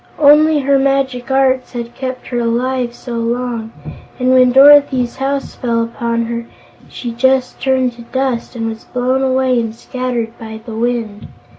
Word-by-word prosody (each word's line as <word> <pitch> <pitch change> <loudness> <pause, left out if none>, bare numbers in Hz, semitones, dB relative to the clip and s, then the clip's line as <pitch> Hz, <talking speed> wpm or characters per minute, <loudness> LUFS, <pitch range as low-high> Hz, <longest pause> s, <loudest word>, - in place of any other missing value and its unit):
"Only 300 +1 +5
her 275 0 +2
magic 270 -2 0
arts 265 -1 +1
had 235 -1 -6
kept 255 -1 -6
her 245 - -1
alive 240 +1 -1
so 240 -2 -6
long, 230 -1 -3 0.5
and 255 0 +2
when 255 -1 +5
Dorothy's 270 -2 +5
house 270 +1 -2
fell 230 -2 -1
upon 230 0 -2
her 235 0 -5 0.4
she 240 - -6
just 260 +2 0
turned 260 -2 +1
to 235 - -13
dust, 250 0 -3
and 225 -1 -3
was 225 0 -6
blown 255 +1 -1
away 260 -1 +1
and 225 -1 -3
scattered 245 -2 -4
by 220 -1 -8
the 230 - -7
wind. 225 -3 -3
250 Hz, 160 wpm, -16 LUFS, 235-265 Hz, 0.5 s, Only